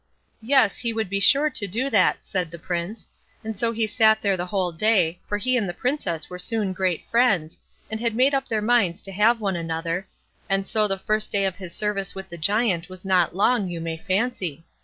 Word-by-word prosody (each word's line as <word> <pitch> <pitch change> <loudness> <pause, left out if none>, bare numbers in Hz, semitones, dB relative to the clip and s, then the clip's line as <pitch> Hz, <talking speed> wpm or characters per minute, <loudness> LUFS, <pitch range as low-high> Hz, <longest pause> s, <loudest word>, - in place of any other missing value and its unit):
"Yes, 245 -2 +3
he 235 -2 -1
would 220 -4 -3
be 200 - +1
sure 290 +8 +5
to 205 -6 -1
do 235 +8 -1
that", 220 - +4
said 180 -3 -2
the 170 - -9
Prince; 175 +5 -4 0.4
and 220 0 -4
so 230 +4 0
he 225 -1 0
sat 220 0 +3
there 200 -2 +1
the 180 0 -4
whole 185 -2 -1
day, 180 -2 +1
for 205 - -1
he 255 +5 0
and 215 -7 0
the 175 - -5
Princess 185 - -2
were 180 0 -8
soon 205 0 0
great 185 -3 -1
friends, 200 -10 +1 0.3
and 220 0 -5
had 230 -1 -1
made 260 +4 +3
up 270 0 0
their 215 -2 -1
minds 215 -7 +2
to 195 - -3
have 220 +5 +3
one 195 -3 -1
another, 165 +2 -3 0.4
and 195 0 0
so 215 -1 +3
the 195 -1 -1
first 215 +2 0
day 200 -1 +1
of 190 -2 -2
his 185 -3 -8
service 210 -2 -2
with 190 0 -7
the 170 - -8
Giant 195 -1 +1
was 185 +1 -8
not 180 -3 +2
long, 205 0 +2
you 170 -1 -5
may 165 0 -3
fancy. 185 - -2
200 Hz, 220 wpm, -24 LUFS, 180-225 Hz, 0.4 s, sure